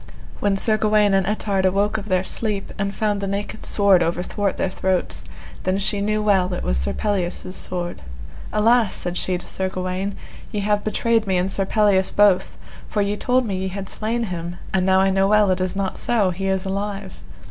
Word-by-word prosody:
When 200 -1 +1
Sir 215 +2 +2
Gawaine 210 -1 +3
and 195 -1 +2
Ettard 200 -2 0
awoke 200 +3 +2
of 210 +1 -9
their 185 -1 +2
sleep, 205 0 -2
and 200 0 -2
found 210 -2 0
the 200 - -2
naked 200 +2 -4
sword 200 -3 +4
overthwart 180 +4 -1
their - - 0
throats, 185 -1 -1 0.4
then 185 +1 0
she 200 0 0
knew 215 +1 0
well 190 -3 +3
it - - -5
was - - 0
Sir 65 0 -1
Pelleas' 185 - -2
sword. 175 -1 -4 0.5
Alas! 225 0 +3
said 175 0 -4
she 180 0 0
to 175 - -10
Sir 190 0 -2
Gawaine, 185 +2 -3 0.4
ye 210 -2 -2
have 205 0 +1
betrayed 225 +1 +1
me 190 -1 +2
and 185 +2 0
Sir 195 0 0
Pelleas 200 -3 +3
both, 205 -3 +3 0.3
for 210 - 0
ye 200 +1 -1
told 250 +3 +1
me 195 -4 -2
ye 190 +1 -2
had 195 +1 -5
slain 230 +4 -2
him, 175 -4 -4 0.2
and 190 -1 +2
now 190 0 +5
I 195 0 +3
know 195 0 +3
well 210 -1 +4
it 185 0 0
is 185 0 -1
not 195 -1 -2
so, 210 -6 +1
he 195 +2 -3
is 190 0 0
alive. 195 0 -4
195 Hz, 205 wpm, -22 LUFS, 185-210 Hz, 0.5 s, now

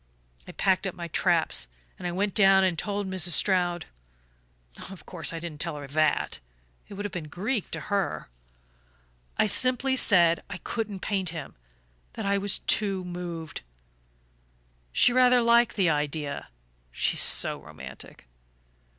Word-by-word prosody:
I - - -8
packed - - +1
up - - -5
my - - -7
traps, - - +1 0.3
and 175 -1 -4
went 200 0 0
down 195 -2 +5
and 185 -2 +1
told 200 +3 -3
Mrs. 180 -2 +2
Stroud. 175 0 +1 1.0
Of 190 -4 -12
course 165 -3 -3
I 165 - -5
didn't 160 -2 -7
tell 170 -3 -2
her 145 -1 -7
THAT 150 +2 0 0.5
it 200 - -10
would 205 +1 -5
have 205 - -4
been 165 -4 -6
Greek 205 - -3
to - - -4
her. 200 -3 -2 1.1
I - - +4
simply 255 +4 +3
said 170 -9 +4
I 190 - -5
couldn't 210 -2 -5
paint 195 -4 -1
him, 160 -3 -7 0.6
that - - -6
I 200 0 +1
was 200 0 +2
too 195 -3 +1
moved. 175 -3 -6 1.3
She 240 - +4
rather 250 0 +5
liked 235 +1 +4
the 185 -5 +2
idea 145 - -3 0.4
she's - - +1
so - - +3
romantic! - - -12
185 Hz, 145 wpm, -26 LUFS, 165-205 Hz, 1.3 s, down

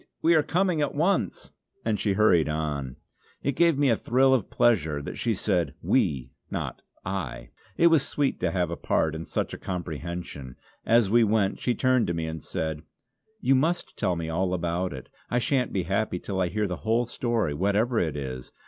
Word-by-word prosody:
We 170 - +5
are 155 - +5
coming 175 0 +1
at 145 - -1
once!" 165 - 0 0.3
and 110 -3 0
she 100 0 +1
hurried 95 -6 +4
on. 75 -4 -3 0.5
It 140 -1 0
gave 170 -2 +4
me 140 -1 +3
a - - +4
thrill 130 +4 +3
of 125 -7 +1
pleasure 80 -11 +2
that 70 - -7
she 115 -2 0
said 90 -3 0
"we" 65 -4 +1 0.2
not - - -4 0.2
"I;" 95 -8 -4 0.3
it 170 - +4
was 165 -3 +6
sweet 140 0 -1
to 90 - +1
have 85 -1 -1
a - - -2
part 80 -1 0
in 80 +1 -5
such - - -2
a - - -6
comprehension. 85 -6 -5 0.3
As 115 -3 +4
we 120 +1 +6
went 105 -2 +1
she 125 - 0
turned 130 -2 +2
to 85 - -1
me 80 -1 -2
and 80 -1 -5
said: 80 -1 -3 0.6
"You 135 - +3
must 160 +7 0
tell 95 -5 0
me 85 -1 -4
all 90 +3 0
about 85 +1 -1
it; 65 -2 -8 0.2
I 125 - 0
shan't 125 +1 +1
be 95 - -1
happy 95 +2 -1
till 95 +1 -3
I 90 - +2
hear 105 +4 -1
the 90 -3 -3
whole 115 +4 +1
story, 115 -8 -1
whatever 100 - +1
it 80 -3 -1
is. 65 -2 -6
95 Hz, 200 wpm, -26 LUFS, 80-120 Hz, 0.6 s, was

